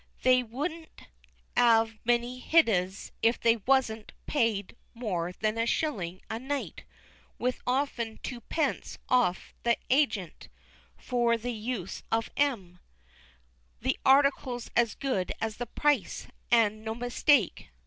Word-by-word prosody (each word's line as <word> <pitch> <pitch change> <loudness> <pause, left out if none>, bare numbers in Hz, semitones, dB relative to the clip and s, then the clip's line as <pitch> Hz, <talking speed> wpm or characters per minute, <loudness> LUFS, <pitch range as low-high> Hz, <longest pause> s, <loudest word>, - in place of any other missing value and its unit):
They 255 0 +5
wouldn't 305 +8 -6 0.5
'ave 225 -2 +4
many 240 +1 +1
hideas 200 - +2
if 230 +1 +3
they 230 0 +4
wasn't 225 -2 0
paid 225 -8 0 0.2
more 180 -8 -2
than 215 +4 -2
a 230 - +1
shilling 185 - -2
a 220 - -4
night 275 +3 -4 0.5
(with 250 +1 -1
often 250 -4 -1
twopence 265 +4 -3
off 240 -8 +2
to - - -29
the 235 0 +3
hagent) 245 - +1 0.5
for 240 -2 +1
the 245 +2 -4
use 215 -4 -4
of 225 0 0
'em; 200 -12 -1 1.0
the - - 0
article's 265 -3 +3
as 235 -3 +2
good 255 -10 -1
as 220 -1 -3
the 245 - -4
price, 295 +4 0 0.2
an' 215 -2 +3
no 220 0 -3
mistake. 245 - +2
235 Hz, 125 wpm, -29 LUFS, 215-255 Hz, 1.0 s, They